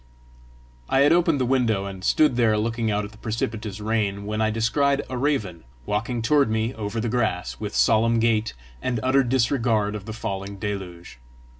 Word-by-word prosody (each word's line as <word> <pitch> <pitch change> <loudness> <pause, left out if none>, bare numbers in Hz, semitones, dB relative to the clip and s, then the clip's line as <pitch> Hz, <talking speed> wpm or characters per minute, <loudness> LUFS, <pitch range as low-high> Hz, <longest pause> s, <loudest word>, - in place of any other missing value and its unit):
I 135 - +3
had 145 +2 +5
opened 170 -4 +3
the 130 - +1
window, 120 -6 +1
and 95 -1 -7
stood 150 +4 +3
there 115 -3 +3
looking 115 +1 -1
out 105 0 0
at 100 - -10
the 110 - -17
precipitous 110 -2 -4
rain, 105 -2 -1
when 110 +1 -2
I 110 - +2
descried 135 +6 +1
a - - -3
raven 120 - -1 0.2
walking 115 +3 -2
toward 140 0 +3
me 110 +2 -1
over 110 -1 -4
the 115 - -1
grass, 90 - -1
with - - -5
solemn 110 - +3
gait, 115 -1 +1 0.3
and 125 -3 -1
utter 130 +1 +4
disregard 115 -4 +1
of 105 -2 -6
the 110 - -6
falling 100 -3 -5
deluge. 95 -8 -6
110 Hz, 180 wpm, -24 LUFS, 105-120 Hz, 0.3 s, had